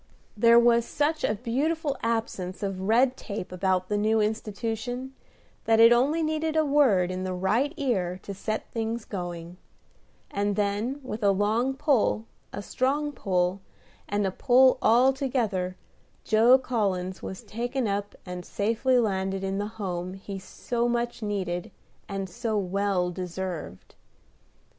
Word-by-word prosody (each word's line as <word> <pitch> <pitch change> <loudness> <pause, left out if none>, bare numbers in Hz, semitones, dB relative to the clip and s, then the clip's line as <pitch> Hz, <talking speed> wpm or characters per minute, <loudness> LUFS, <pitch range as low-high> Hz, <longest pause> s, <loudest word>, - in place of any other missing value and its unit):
There 230 +2 +6
was 235 0 +5
such 300 +5 -1
a 210 - +1
beautiful 280 +7 -1
absence 215 -5 -2
of 195 -2 -3
red 250 +3 +4
tape 200 -7 -6
about 185 0 0
the 205 +1 0
new 220 +1 +2
institution 225 +4 -3 0.5
that 225 0 +4
it 230 +1 +8
only 290 +7 +2
needed 315 0 -1
a 315 -1 +3
word 250 -12 +3
in 185 0 -3
the 185 -1 -3
right 215 +10 +1
ear 190 - -1
to 200 - -6
set 215 +3 -3
things 225 0 -3
going; 175 -2 -6 0.7
and 205 0 0
then, 210 +7 -1
with 230 -3 -5
a 200 - +4
long 215 +7 +1
pull, 260 -6 +1 0.3
a 200 - -6
strong 285 +7 0
pull, 185 -6 0 0.5
and 205 0 0
a 190 - 0
pull 255 +5 +4
all 250 +4 +5
together, 220 -9 -1 0.5
Joe 230 +4 +6
Collins 195 -8 -2
was 190 +4 -7
taken 240 +3 -2
up 200 0 -2
and 180 -1 -6
safely 230 +7 +1
landed 195 -4 0
in 195 +1 -2
the 205 - -2
Home 185 -2 -4
he 195 0 -7
so 235 +5 -2
much 240 0 -2
needed 190 -2 -2 0.4
and 195 -1 -3
so 220 +2 -2
well 195 -2 0
deserved. 180 - -6
215 Hz, 145 wpm, -27 LUFS, 190-245 Hz, 0.7 s, it